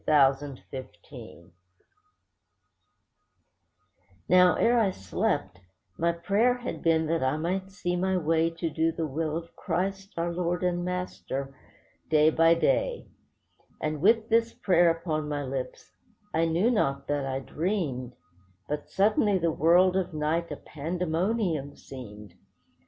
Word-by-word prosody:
CHRIST 140 Hz, -2 st, +3 dB
CRUCIFIED 85 Hz, -8 st, -10 dB, 2.8 s
Now 180 Hz, 0 st, +6 dB
ere 240 Hz, +1 st, +3 dB
I 215 Hz, -4 st, +3 dB
slept, 95 Hz, -, -2 dB, 0.4 s
my 170 Hz, +1 st, +1 dB
prayer 205 Hz, +8 st, +2 dB
had 245 Hz, +1 st, -6 dB
been 160 Hz, -1 st, +2 dB
that 165 Hz, +1 st, 0 dB
I 130 Hz, +3 st, +1 dB
might 185 Hz, +4 st, -2 dB
see 180 Hz, -2 st, -3 dB
my 190 Hz, +1 st, +1 dB
way 165 Hz, 0 st, +2 dB
To 165 Hz, 0 st, -4 dB
do 160 Hz, +1 st, +1 dB
the 165 Hz, 0 st, -3 dB
will 155 Hz, +2 st, -2 dB
of 170 Hz, 0 st, -9 dB
Christ, 195 Hz, +2 st, -3 dB
our 170 Hz, +1 st, -1 dB
Lord 175 Hz, +1 st, -1 dB
and 175 Hz, -1 st, 0 dB
Master, 175 Hz, -7 st, -4 dB, 0.6 s
day 155 Hz, 0 st, +5 dB
by 165 Hz, +1 st, +5 dB
day; -, -, 0 dB, 0.7 s
And 155 Hz, -1 st, -3 dB
with 220 Hz, +3 st, +4 dB
this 230 Hz, 0 st, +2 dB
prayer 175 Hz, -2 st, +4 dB
upon 160 Hz, -2 st, -2 dB
my 145 Hz, -1 st, -2 dB
lips, 130 Hz, -1 st, -5 dB, 0.4 s
I 165 Hz, +1 st, +2 dB
knew 170 Hz, +9 st, +2 dB
not 140 Hz, -, 0 dB
that 145 Hz, -2 st, -1 dB
I 130 Hz, 0 st, -2 dB
dreamed, 140 Hz, -, -3 dB, 0.5 s
But 150 Hz, 0 st, -4 dB
suddenly 205 Hz, 0 st, +2 dB
the 170 Hz, -2 st, +1 dB
world 175 Hz, +4 st, +4 dB
of 185 Hz, -3 st, -1 dB
night 160 Hz, +3 st, -1 dB
a -, -, -3 dB
pandemonium 165 Hz, 0 st, -2 dB
seemed. 105 Hz, -6 st, -11 dB
165 Hz, 135 wpm, -27 LUFS, 150-185 Hz, 2.8 s, Now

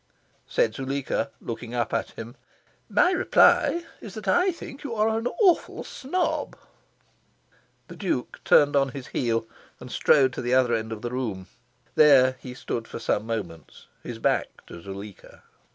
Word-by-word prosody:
Said 110 Hz, -, +1 dB
Zuleika, 135 Hz, +2 st, -2 dB
looking 120 Hz, +1 st, -6 dB
up 120 Hz, -2 st, -1 dB
at 115 Hz, -, -1 dB
him, 115 Hz, +1 st, -7 dB, 0.6 s
"My 360 Hz, -, +4 dB
reply 345 Hz, -1 st, +4 dB
is 205 Hz, -, -10 dB
that 215 Hz, -2 st, -8 dB
I 360 Hz, -, +3 dB
think 285 Hz, -4 st, -10 dB
you 255 Hz, -5 st, -4 dB
are 215 Hz, +1 st, +2 dB
an 225 Hz, +2 st, -1 dB
awful 375 Hz, -6 st, +2 dB
snob." 355 Hz, +8 st, -2 dB, 1.3 s
The -, -, -10 dB
Duke 180 Hz, -11 st, -3 dB
turned 145 Hz, -1 st, +5 dB
on 135 Hz, -1 st, +3 dB
his 130 Hz, -, -7 dB
heel, 115 Hz, -2 st, -1 dB, 0.3 s
and -, -, -10 dB
strode 135 Hz, -3 st, +4 dB
to -, -, -4 dB
the 125 Hz, +1 st, +1 dB
other 125 Hz, -2 st, +3 dB
end 110 Hz, 0 st, -2 dB
of 110 Hz, -1 st, -6 dB
the 120 Hz, -, -3 dB
room. 110 Hz, -8 st, -3 dB, 0.5 s
There 130 Hz, -4 st, +6 dB
he 125 Hz, -1 st, -9 dB
stood 115 Hz, -2 st, -4 dB
for -, -, -7 dB
some 110 Hz, -1 st, -1 dB
moments, 90 Hz, -9 st, -6 dB, 0.2 s
his -, -, -7 dB
back -, -, -1 dB
to 85 Hz, -, -11 dB
Zuleika. 100 Hz, +1 st, -10 dB
130 Hz, 160 wpm, -25 LUFS, -, 1.3 s, There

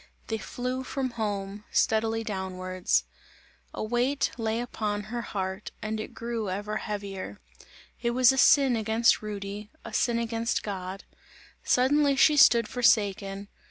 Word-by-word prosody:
They 225 Hz, -1 st, -1 dB
flew 250 Hz, +3 st, -4 dB
from 260 Hz, -1 st, -3 dB
home. 205 Hz, -3 st, -4 dB
Steadily 225 Hz, 0 st, +1 dB
downwards. 185 Hz, -3 st, -1 dB, 0.7 s
A -, -, -5 dB
weight 245 Hz, +5 st, 0 dB
lay 225 Hz, -1 st, -1 dB
upon 210 Hz, -4 st, -3 dB
her 240 Hz, -, -1 dB
heart 190 Hz, -2 st, -4 dB
and 215 Hz, 0 st, -3 dB
it 215 Hz, -, -7 dB
grew 230 Hz, -3 st, -3 dB
ever 205 Hz, +3 st, -3 dB
heavier. 200 Hz, -, -5 dB, 0.6 s
It 235 Hz, -, +1 dB
was 250 Hz, +1 st, +5 dB
a 265 Hz, -, -2 dB
sin 275 Hz, -3 st, +6 dB
against 225 Hz, +1 st, +2 dB
Rudy, 205 Hz, 0 st, -6 dB, 0.2 s
a -, -, -8 dB
sin 235 Hz, -1 st, +1 dB
against 230 Hz, 0 st, -1 dB
God; 190 Hz, -1 st, -5 dB, 0.6 s
suddenly 280 Hz, +3 st, +3 dB
she 300 Hz, +2 st, +5 dB
stood 235 Hz, -5 st, +6 dB
forsaken. 200 Hz, -4 st, +1 dB
220 Hz, 135 wpm, -27 LUFS, 200-240 Hz, 0.7 s, sin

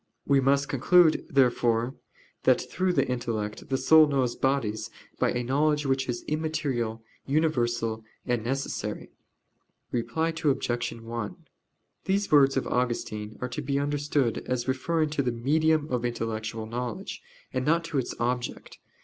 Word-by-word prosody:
We 140 Hz, -1 st, +4 dB
must 140 Hz, +1 st, +2 dB
conclude, 155 Hz, +5 st, +4 dB
therefore, 120 Hz, -3 st, +2 dB, 0.5 s
that -, -, +4 dB
through 185 Hz, -1 st, -1 dB
the -, -, +2 dB
intellect 115 Hz, -4 st, -3 dB
the 135 Hz, -, +1 dB
soul 155 Hz, +2 st, +6 dB
knows 135 Hz, -4 st, 0 dB
bodies 130 Hz, -6 st, 0 dB, 0.3 s
by -, -, +3 dB
a 120 Hz, -, -1 dB
knowledge 150 Hz, +4 st, +1 dB
which 135 Hz, -1 st, 0 dB
is 120 Hz, -1 st, -2 dB
immaterial, 145 Hz, -8 st, -2 dB, 0.2 s
universal, 120 Hz, -7 st, 0 dB, 0.2 s
and 120 Hz, -3 st, 0 dB
necessary. 135 Hz, +3 st, -3 dB, 0.8 s
Reply 125 Hz, +7 st, 0 dB
Obj. 135 Hz, -6 st, 0 dB
1: 115 Hz, +5 st, -5 dB, 0.7 s
These 200 Hz, +1 st, 0 dB
words 135 Hz, -2 st, +6 dB
of 135 Hz, -, 0 dB
Augustine 110 Hz, -4 st, -2 dB
are 125 Hz, -, -2 dB
to 120 Hz, -, -4 dB
be 140 Hz, +1 st, -1 dB
understood 145 Hz, -3 st, 0 dB
as 125 Hz, -1 st, -1 dB
referring 155 Hz, +4 st, 0 dB
to 150 Hz, -, +1 dB
the 125 Hz, -2 st, 0 dB
medium 155 Hz, +6 st, +2 dB
of 125 Hz, -1 st, 0 dB
intellectual 115 Hz, -2 st, -3 dB
knowledge, 120 Hz, +1 st, -5 dB, 0.3 s
and 130 Hz, -, 0 dB
not 165 Hz, +4 st, +2 dB
to 165 Hz, -4 st, -1 dB
its 125 Hz, -, -3 dB
object. 120 Hz, 0 st, -3 dB
130 Hz, 140 wpm, -27 LUFS, 120-150 Hz, 0.8 s, soul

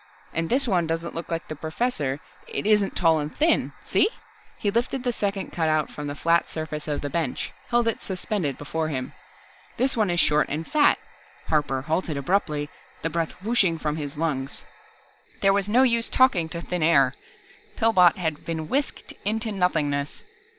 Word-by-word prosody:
"And 165 Hz, 0 st, -1 dB
this 265 Hz, +2 st, +3 dB
one 175 Hz, -6 st, +2 dB
doesn't 165 Hz, +1 st, -2 dB
look 165 Hz, -, -5 dB
like 165 Hz, 0 st, -3 dB
the 155 Hz, -, -5 dB
Professor, 155 Hz, -, -2 dB, 0.3 s
isn't 210 Hz, -1 st, +1 dB
tall 165 Hz, -3 st, +4 dB
and 150 Hz, 0 st, -4 dB
thin. 320 Hz, +2 st, +3 dB
See -, -, +3 dB, 0.3 s
?" -, -, -29 dB
He 205 Hz, -, 0 dB
lifted 245 Hz, +3 st, 0 dB
the 245 Hz, -2 st, 0 dB
second 200 Hz, -3 st, -2 dB
cutout 155 Hz, -2 st, +1 dB
from 150 Hz, -1 st, -6 dB
the 145 Hz, -, -4 dB
flat 170 Hz, +3 st, +2 dB
surface 155 Hz, -1 st, -5 dB
of 150 Hz, -1 st, -1 dB
the 145 Hz, -, -3 dB
bench, 160 Hz, -5 st, -2 dB, 0.2 s
held 240 Hz, -1 st, +2 dB
it 230 Hz, -, 0 dB
suspended 185 Hz, -6 st, -2 dB
before 160 Hz, +2 st, -2 dB
him. 130 Hz, -4 st, -4 dB, 0.6 s
"This 260 Hz, +3 st, +2 dB
one 215 Hz, -4 st, +2 dB
is 175 Hz, 0 st, +1 dB
short 150 Hz, -3 st, +3 dB
and 155 Hz, +3 st, -3 dB
fat 295 Hz, -, +4 dB, 0.3 s
" -, -, -26 dB
Harper 140 Hz, -4 st, +1 dB
halted 160 Hz, 0 st, -1 dB
abruptly, 150 Hz, -1 st, 0 dB, 0.4 s
the 165 Hz, -, -1 dB
breath 165 Hz, 0 st, -1 dB
whooshing 200 Hz, -7 st, +2 dB
from 155 Hz, -1 st, -2 dB
his 145 Hz, -2 st, -5 dB
lungs. 140 Hz, -4 st, -2 dB, 0.8 s
There 195 Hz, 0 st, +5 dB
was 200 Hz, 0 st, 0 dB
no 245 Hz, +5 st, +5 dB
use 235 Hz, -2 st, +3 dB
talking 200 Hz, -11 st, +3 dB
to 170 Hz, 0 st, -5 dB
thin 180 Hz, -1 st, -3 dB
air. 140 Hz, -5 st, +4 dB, 0.6 s
Pillbot 185 Hz, -7 st, +5 dB
had 160 Hz, -5 st, -2 dB
been 160 Hz, -2 st, -3 dB
whisked 280 Hz, +2 st, -2 dB
into 220 Hz, +2 st, 0 dB
nothingness. 150 Hz, -7 st, 0 dB
165 Hz, 180 wpm, -25 LUFS, 150-205 Hz, 0.8 s, There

